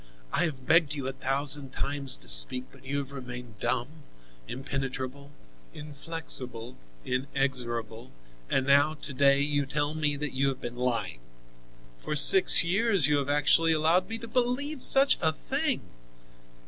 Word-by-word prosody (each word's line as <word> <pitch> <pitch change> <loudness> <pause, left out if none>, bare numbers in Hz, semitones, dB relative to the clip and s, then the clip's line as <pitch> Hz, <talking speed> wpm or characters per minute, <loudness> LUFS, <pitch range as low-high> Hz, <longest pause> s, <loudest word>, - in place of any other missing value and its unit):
I - - +2
have 135 -5 -7
begged 155 -3 +2
you 140 -3 -5
a - - -1
thousand 135 +1 +1
times 140 -1 0
to - - -14
speak, - - +5
but - - -20
you 135 +2 -5
have 140 -1 -6
remained 125 -5 -9
dumb, 130 +6 -3 0.5
impenetrable, 135 +1 -6 0.5
inflexible, 140 -5 -6 0.3
inexorable, 125 -3 -4 0.4
and 130 - -1
now 145 +3 +2
to 145 -1 -7
day 140 +1 +2
you 145 -1 -2
tell 145 +1 -3
me 150 -2 -2
that 150 0 -6
you 135 +1 -1
have 135 -1 -4
been 120 -2 -8
lying. 120 - -3 0.8
For 150 - -5
six 175 +6 +8
years 195 - +1
you 145 0 +1
have 140 0 -3
actually 150 +3 +2
allowed 160 +5 +1
me 225 - -5
to 230 0 -10
believe 255 +5 -1
such 275 +1 +4
a 160 - +3
thing! 275 - -1
140 Hz, 150 wpm, -26 LUFS, 130-155 Hz, 0.8 s, six